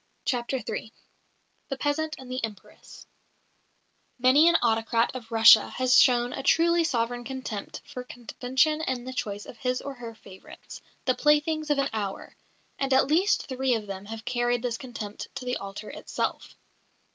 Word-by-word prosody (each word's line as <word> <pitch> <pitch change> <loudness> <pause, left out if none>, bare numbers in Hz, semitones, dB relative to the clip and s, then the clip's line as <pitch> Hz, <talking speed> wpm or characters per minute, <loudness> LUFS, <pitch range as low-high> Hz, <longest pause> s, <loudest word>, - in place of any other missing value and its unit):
CHAPTER 250 0 -1
III 220 - -4 0.8
THE 270 - -3
PEASANT 310 +3 -1
AND 260 -1 -10
THE 255 -1 -3
EMPRESS 215 -3 -9 1.1
Many 260 +6 +5
an 340 - +5
autocrat 230 0 +1
of 240 -3 -9
Russia 225 -1 +7
has 255 0 +4
shown 245 -2 +3
a - - -4
truly 335 +4 +3
sovereign 245 -4 -1
contempt 255 -5 -6
for 250 - -7
convention 260 +5 -1
in 260 -5 -2
the 260 +1 -7
choice 205 -4 -4
of - - -11
his 250 0 -1
or 280 - -6
her 235 -3 -9
favourites, 190 -3 -13 0.2
the 255 - +3
"playthings 300 +2 +2
of 295 - +2
an 275 0 +1
hour"; 205 -3 -4 0.4
and 275 -1 -1
at 265 - +5
least 365 +7 +2
three 260 -1 0
of 215 -2 -4
them 195 -1 -7
have 220 +1 -8
carried 240 0 0
this 240 -2 -2
contempt 225 -5 -7
to 250 - -6
the 250 0 -1
altar 200 +2 -8
itself. - - -4
250 Hz, 165 wpm, -26 LUFS, 230-270 Hz, 1.1 s, Russia